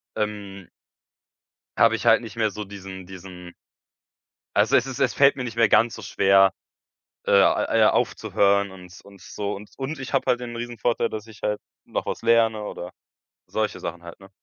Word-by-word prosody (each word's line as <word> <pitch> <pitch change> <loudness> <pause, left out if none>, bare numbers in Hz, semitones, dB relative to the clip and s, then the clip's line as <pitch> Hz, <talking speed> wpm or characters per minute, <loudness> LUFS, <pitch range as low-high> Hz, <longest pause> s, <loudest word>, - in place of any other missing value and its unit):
ähm 100 -3 -4 1.1
habe - - +5
ich - - -6
halt - - +6
nicht 115 -3 -9
mehr 110 -2 0
so 105 +2 -6
diesen 95 -2 -9
diesen 90 -1 -11 1.0
also, 110 +6 +3
es 120 - +1
es 135 0 -6
es 130 -3 +2
fällt 140 0 +5
mir 130 - -4
nicht 120 -2 -6
mehr 115 -2 +4
ganz 115 +2 +4
so - - -9
schwer, 95 0 +4 0.7
äh, - - -2
a 100 0 +4
ja - - +6
aufzuhören 100 0 +1
und 90 0 -13
und 100 -1 -16
so 100 +3 -5
und 105 +1 -10
und 140 +4 -4
ich 135 - -7
habe - - +1
halt 125 - +2
den 120 -1 -6
Riesenvorteil, 120 0 -1
dass 110 0 -7
ich 110 -2 -14
halt 105 0 -1 0.2
noch - - -4
was - - -4
lerne 115 -2 +3
oder 90 -3 -7 0.6
solche - - -2
Sachen 85 +1 -6
halt, 85 0 -11
ne? 95 0 -15
105 Hz, 185 wpm, -24 LUFS, 95-115 Hz, 1.1 s, halt